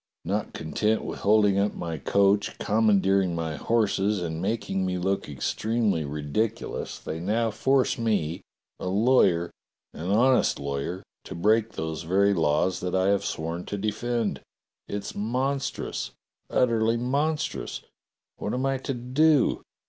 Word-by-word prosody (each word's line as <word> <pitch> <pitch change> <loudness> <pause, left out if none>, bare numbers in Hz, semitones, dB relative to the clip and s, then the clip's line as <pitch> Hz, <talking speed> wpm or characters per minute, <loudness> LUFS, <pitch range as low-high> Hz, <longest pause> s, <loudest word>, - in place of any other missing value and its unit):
"Not 100 +4 -2
content 105 +8 0
with - - -5
holding 105 -1 +4
up 100 +1 +1
my 85 -3 -4
coach, 100 +3 +2
commandeering 100 -4 +2
my 80 -2 -3
horses, 105 +1 +1
and 80 -2 -3
making 95 -1 -1
me 90 -1 -1
look 95 -2 -1
extremely 105 - 0
ridiculous, 75 +11 -3
they 80 - -6
now 110 +6 0
force 130 +4 +1
me, 100 -8 0 0.4
a - - -4
lawyer, 95 -4 +3 0.4
an 85 +4 -5
honest 125 +5 +3
lawyer, 70 +6 -3 0.2
to - - -7
break 110 +5 +2
those 80 0 -4
very 100 +4 +3
laws 80 +1 +1
that 90 0 -2
I 95 +1 +3
have 100 -1 +2
sworn 85 +2 -3
to 100 - -3
defend. 110 +2 -1 0.5
It's 100 0 -4
monstrous! 130 +6 -2 0.4
Utterly 115 -2 +2
monstrous! 145 +6 -1 0.6
What 105 - -3
am 130 +2 -1
I 135 -1 0
to 135 0 -3
do. 135 +4 +3
100 Hz, 135 wpm, -26 LUFS, 90-115 Hz, 0.6 s, holding